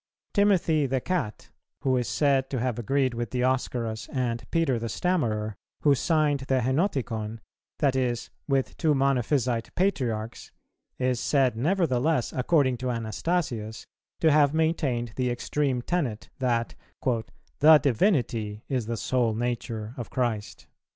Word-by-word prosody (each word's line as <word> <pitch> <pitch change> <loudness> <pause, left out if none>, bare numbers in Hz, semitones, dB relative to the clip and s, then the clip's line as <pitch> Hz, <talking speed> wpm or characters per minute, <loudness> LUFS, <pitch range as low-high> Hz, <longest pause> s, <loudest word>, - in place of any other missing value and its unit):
[315:2] - - -51
Timothy 180 -7 +3
the 130 0 0
Cat, 125 - -3 0.3
who 130 -1 +2
is 125 -2 0
said 135 -3 +2
to 135 - -2
have 125 -1 -1
agreed 130 +2 +1
with 120 0 -3
Dioscorus 125 -3 -1
and 120 -3 -2
Peter 160 -8 +1
the 115 0 -4
Stammerer, 110 - 0 0.3
who 145 - +5
signed 150 0 +2
the 135 0 0
Henoticon, 125 - -1 0.4
that 140 -3 +2
is, 120 -2 -1 0.2
with 135 -2 0
two 155 -3 +2
Monophysite 130 -3 +1
Patriarchs, 120 - -1 0.5
is 125 -1 0
said 135 -4 +2
nevertheless, 155 - +1
according 130 -1 +2
to 130 +1 -3
Anastasius, 115 - -2 0.4
to 160 - +5
have 145 0 +4
maintained 140 -8 0
the 125 -1 +1
extreme 125 +1 -1
tenet, 135 -12 -2
that 120 -3 0 0.9
"the 155 +1 +9
Divinity 115 - 0
is 125 -5 -1
the 115 0 -2
sole 120 -2 +1
nature 115 -2 -3
of 120 - -6
Christ." 115 -5 -2
130 Hz, 135 wpm, -27 LUFS, 115-145 Hz, 0.9 s, the